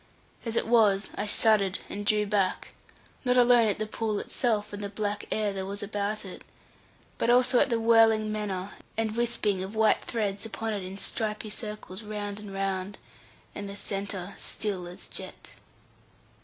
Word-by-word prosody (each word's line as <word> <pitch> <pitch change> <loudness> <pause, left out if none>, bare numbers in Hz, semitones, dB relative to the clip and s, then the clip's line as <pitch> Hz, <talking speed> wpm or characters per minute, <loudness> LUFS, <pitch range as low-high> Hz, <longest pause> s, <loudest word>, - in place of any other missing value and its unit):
As 230 -1 -1
it - - +2
was, 215 -4 +4
I - - -3
shuddered 205 -3 +4
and 205 0 -5
drew 210 -1 +4
back; 200 -2 0 0.5
not 250 -1 +3
alone 245 -2 +6
at 205 - +1
the 215 - -2
pool 215 0 -2
itself 215 -2 -1
and 205 0 -5
the 200 - -3
black 205 0 -3
air 210 -2 0
there 190 -1 -3
was 200 +2 -5
about 205 +1 -2
it, 185 - -9 0.8
but - - +1
also 245 +1 +5
at - - +3
the 230 -2 +1
whirling 225 -1 +5
manner, 205 -2 -3 0.3
and 220 -1 0
wisping 225 -5 +1
of 195 +3 -7
white 220 0 +3
threads 205 -4 -2
upon 225 0 -3
it 200 -2 -3
in 185 +1 -6
stripy 215 +1 -2
circles 210 -3 -6
round 210 -1 -5
and 210 -1 -9
round; 195 0 -2 0.6
and 200 -1 -6
the 200 - -7
centre 195 -2 -3
still 195 -5 -1
as 175 - -8
jet. - - -7
210 Hz, 170 wpm, -28 LUFS, 200-220 Hz, 0.8 s, alone